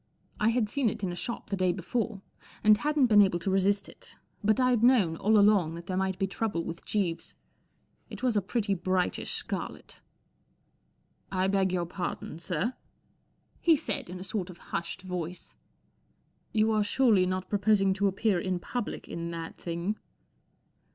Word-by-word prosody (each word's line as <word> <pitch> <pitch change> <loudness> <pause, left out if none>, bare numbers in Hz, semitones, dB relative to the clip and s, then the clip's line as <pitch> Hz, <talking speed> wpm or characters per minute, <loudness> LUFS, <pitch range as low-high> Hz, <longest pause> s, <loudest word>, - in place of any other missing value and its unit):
I 215 - +3
had 230 -2 +1
seen 255 +1 +1
it 215 -1 -7
in 185 - 0
a - - -5
shop 220 +3 -6
the - - +2
day 185 -2 +2
before 200 +3 -3 0.4
and 215 0 +7
hadn't 295 +4 +2
been 210 -4 +6
able 190 -3 +3
to 175 +3 -2
resist 195 +1 +2
it, - - -13 0.3
but 215 +4 +3
I'd 250 -3 +3
known 230 -10 +4
all 215 +2 +3
along 200 -6 +4
that 170 0 -8
there 185 - -3
might 190 0 0
be 195 - +1
trouble 195 -3 -2
with 165 0 -6
Jeeves. 185 -6 -2 0.7
It - - -9
was 250 -3 +2
a 205 - +3
pretty 205 +1 -1
brightish 185 0 -1
scarlet. - - -5 0.6
'* - - -43
1 190 0 +1
beg 190 -2 +2
your 175 -1 0
pardon, 175 -2 -5
sir," 180 +7 -1 0.9
he 330 -2 +5
said, 220 - -2
in 180 +1 -7
a - - -6
sort 190 -1 -3
of 180 - -10 0.2
hushed 170 +3 -3
voice 180 -1 -6 0.5
" - - -42
You 220 0 +2
are 215 -1 +3
surely 205 -4 +3
not 185 0 -2
proposing 200 -1 +3
to 200 +1 +1
appear 195 0 +1
in 185 +1 -1
public 240 +6 -4
in 170 0 -5
that 165 -1 -6
thing 170 +5 -3
195 Hz, 180 wpm, -29 LUFS, 180-215 Hz, 0.9 s, and